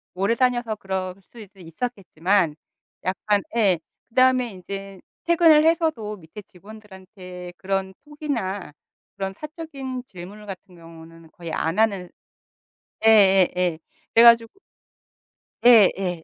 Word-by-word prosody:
오래 195 +5 +1
다녀서 240 -3 0
그럴 190 -2 -4
수 235 - -17
수도 200 -2 -14
있었겠지만, 180 -3 -1 0.5
약간 200 +3 0
예. 195 -7 +3 0.3
그다음에 255 0 +3
인제 195 0 -9 0.2
퇴근을 325 -3 +5
해서도 315 -11 0
밑에 175 +4 -12
직원들한테 190 -2 -12
그런 190 0 -3
톡이나 245 - -4 0.4
그런 195 -1 -4
사적인 280 -4 -7
질문 195 +3 -11
같은 185 -2 -10
경우는 165 0 -15
거의 170 -4 -9
안 160 +4 -2
하는 200 -5 +1 1.0
예예예. 190 -5 +4 0.4
그래 230 - +7
가지고 230 -1 +6 1.1
예예. 195 -7 +5
195 Hz, 255 characters per minute, -23 LUFS, 180-235 Hz, 1.1 s, 그래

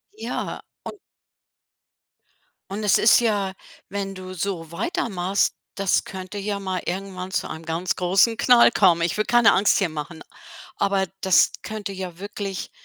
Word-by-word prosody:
Ja 435 - -4 0.2
und 415 - -8 1.7
und 205 +2 -4
es 205 - +4
ist 220 - +6
ja 205 -4 0 0.3
wenn 195 0 -4
du 185 -1 -8
so 175 -3 -4
weiter 345 - -2
machst, 190 0 0 0.2
das 195 -2 +1
könnte 190 +1 -8
ja 200 0 -3
mal 190 -2 -3
irgendwann 185 0 -5
zu - - -2
einem 160 +1 -7
ganz 165 +3 -1
großen 195 +6 +3
Knall 240 -1 +6
kommen. 180 -7 +4
Ich 170 - 0
will 215 - +1
keine 240 -1 +5
Angst 200 +2 +3
hier 190 - +1
machen, 155 +1 -7 0.5
aber 195 -1 +1 0.2
das 190 -3 +4
könnte 215 -2 -5
ja 185 -3 -6
wirklich 200 -1 -5
195 Hz, 155 wpm, -23 LUFS, 180-205 Hz, 1.7 s, ist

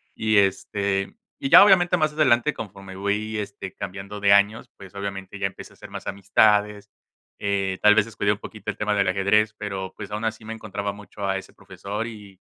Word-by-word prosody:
y, 110 -1 +1
este, 95 - 0 0.2
y 275 -1 -3
ya - - +10
obviamente 180 -3 +5
más 155 -2 +1
adelante 150 -2 +3
conforme 95 -3 -9
voy, 105 +3 -2
este, 100 -2 -6
cambiando 100 +2 -7
de 100 0 +4
años, 105 +4 +3
pues, 95 0 -13
obviamente 100 -1 -6
ya 95 - +1
empecé 95 - -11
a - - -21
hacer - - -12
más - - -8
amistades, 105 +1 +2 0.5
eh, 100 -2 -1
tal 105 0 +6
vez 110 -1 +4
descuide 100 -2 -1
un 105 - -1
poquito 105 -1 -6
el 100 - -15
tema 105 0 0
del 100 -1 +2
ajedrez, 100 +3 +2
pero, 95 -2 -5
pues, 100 -2 -8
aún 105 +2 -4
así 110 0 -3
me 110 - -5
encontraba 100 -2 -5
mucho 100 0 -7
a 95 - 0
ese 95 - -9
profesor 105 +3 -6
y 105 -4 -11
100 Hz, 200 wpm, -24 LUFS, 100-110 Hz, 0.5 s, ya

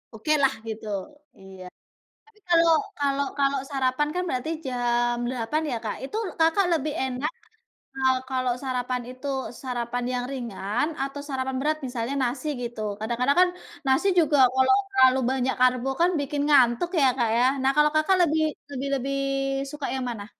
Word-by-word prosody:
Okelah 280 +3 +2 0.2
gitu. 220 -1 -6 0.5
Iya, 190 -1 -12 0.6
tapi 440 -1 -26
kalau 335 -1 +5 0.3
kalau 280 -1 +1
kalau 275 0 +2
sarapan 270 +1 0
kan 360 - 0
berarti 255 +2 -2 0.2
jam 240 -1 0
8.00 255 +5 -1
ya 245 - -1
Kak, 210 - -3
itu 280 - -5 0.2
Kakak 330 +4 +4
lebih 305 -2 0
enak 265 +5 -2 0.6
kalau 260 -1 +2
kalau 255 -1 0
sarapan 250 -1 -2
itu 255 +3 -8 0.3
sarapan 245 -1 -3
yang 245 0 -1
ringan 235 -1 -2
atau 275 +1 -4
sarapan 265 -1 -2
berat 305 +2 +1
misalnya 245 0 -3
nasi 255 +4 -2
gitu, 240 -2 -5 0.2
kadang-kadang 240 +6 0
kan 365 - +5 0.4
nasi 270 +9 +3
juga 310 -3 +3 0.2
kalau 260 +6 +4 0.2
terlalu 260 -7 +5
banyak 265 0 0
karbo 255 +1 +3
kan 350 - +5
bikin 285 0 -2
ngantuk 265 +1 +4
ya - - +5
Kak 235 -3 +1
ya. 240 - +3 0.2
Nah 265 +1 +3
kalau 300 0 +5
Kakak 310 +5 +3
lebih 315 -2 +2 0.3
lebih 275 0 -4
lebih 275 +1 -2 0.6
suka 295 -2 -5
yang 260 - -3
mana? 210 -4 -6
265 Hz, 160 wpm, -25 LUFS, 245-295 Hz, 0.6 s, kalau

